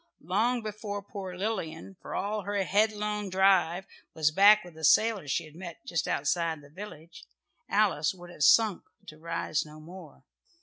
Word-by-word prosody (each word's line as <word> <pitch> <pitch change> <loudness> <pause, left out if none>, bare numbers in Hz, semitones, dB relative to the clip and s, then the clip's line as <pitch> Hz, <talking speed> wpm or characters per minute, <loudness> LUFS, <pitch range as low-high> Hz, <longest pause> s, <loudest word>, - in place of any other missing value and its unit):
Long 225 +8 +1
before 210 -1 -5
poor 190 -2 -7
Lilian, 190 -3 -4
for - - -7
all 210 +2 -2
her 200 0 -1
headlong 210 0 0
drive, 185 -1 +3 0.3
was 155 -1 +2
back 205 +5 +6
with 175 -2 -13
a 160 - -12
sailor 215 +1 +4
she 135 - -1
had 155 - -15
met 170 0 -10
just 165 -3 -2
outside 160 +1 0
the 145 - -17
village, 170 -3 -11 0.4
Alice 195 -8 +2
would 175 -1 -12
have 155 - -13
sunk 215 +4 +5 0.2
to 155 - -12
rise 165 -2 -2
no 155 0 -13
more. 160 -4 -12
185 Hz, 165 wpm, -29 LUFS, 160-205 Hz, 0.4 s, back